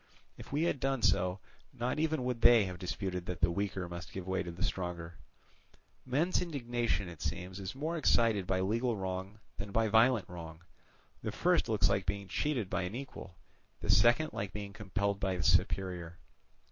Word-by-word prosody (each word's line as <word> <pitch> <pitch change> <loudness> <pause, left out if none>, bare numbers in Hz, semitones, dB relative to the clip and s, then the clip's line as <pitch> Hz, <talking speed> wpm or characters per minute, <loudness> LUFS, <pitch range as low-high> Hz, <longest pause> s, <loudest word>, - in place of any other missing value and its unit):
If - - -12
we 145 +3 +1
had 170 -5 +1
done 135 -3 0
so, 90 -2 +3 0.3
not 125 +5 -2
even 155 -4 +1
would 125 -2 -2
they 120 -2 +7
have 90 -1 -6
disputed 90 -1 -3
that 90 - -4
the 85 0 +4
weaker 95 0 -2
must 85 0 -7
give 95 -2 -6
way 95 0 0
to 85 - -5
the 85 +2 -5
stronger. 85 -3 -3 0.9
Men's 155 +10 +2
indignation, 120 - -1
it 85 -3 -10
seems, 90 +2 -4
is 95 +4 -5
more 160 +5 -2
excited 115 - +3
by 95 -1 +1
legal 115 +4 0
wrong 95 +1 -4 0.2
than 100 0 -5
by 110 +1 +2
violent 115 0 +4
wrong; 85 -2 -9 0.6
the 110 - -3
first 175 - +2
looks 110 -2 +4
like 100 -1 0
being 100 +1 -2
cheated 135 -9 0
by 95 0 -1
an 90 +4 -4
equal, 125 -8 -8 0.5
the - - +2
second 140 +7 +4
like 100 - -4
being 100 -1 -6
compelled 100 0 -1
by 95 -1 0
a 90 -2 -2
superior. 90 -3 +1
100 Hz, 185 wpm, -33 LUFS, 90-120 Hz, 0.9 s, they